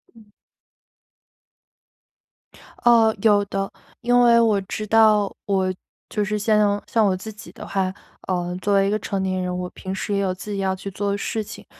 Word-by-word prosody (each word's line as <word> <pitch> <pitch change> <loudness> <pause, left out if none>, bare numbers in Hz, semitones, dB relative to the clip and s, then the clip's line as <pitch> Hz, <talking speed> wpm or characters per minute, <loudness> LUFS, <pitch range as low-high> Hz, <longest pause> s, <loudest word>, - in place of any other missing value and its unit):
嗯。 220 -2 -17 2.6
呃， 230 -2 +5
有 205 -2 +4
的。 195 0 -3 0.3
因 245 +1 +3
为 235 -1 +6
我 220 -3 +3
知 215 +3 -5
道， 215 -2 +4
我 190 -2 0 0.4
就 210 - -1
是 210 +1 -1
像 210 -1 +2
像 225 -2 +2
我 190 -2 +2
自 220 +4 -7
己 215 +1 -12
的 - - -9
话， 190 -1 -1 0.3
呃， 180 -1 -2
作 205 - 0
为 195 0 +4
一 - - +1
个 215 - 0
成 195 -1 -3
年 185 -1 -1
人， 180 0 -3
我 180 0 -4
平 190 0 -6
时 205 - -3
也 200 - +1
有 190 -2 0
自 205 +3 -8
己 200 - -3
要 190 -1 0
去 195 +1 -7
做 200 +1 -2
的 200 - -1
事 220 +2 -3
情。 - - -11
200 Hz, 205 characters per minute, -22 LUFS, 190-215 Hz, 2.6 s, 为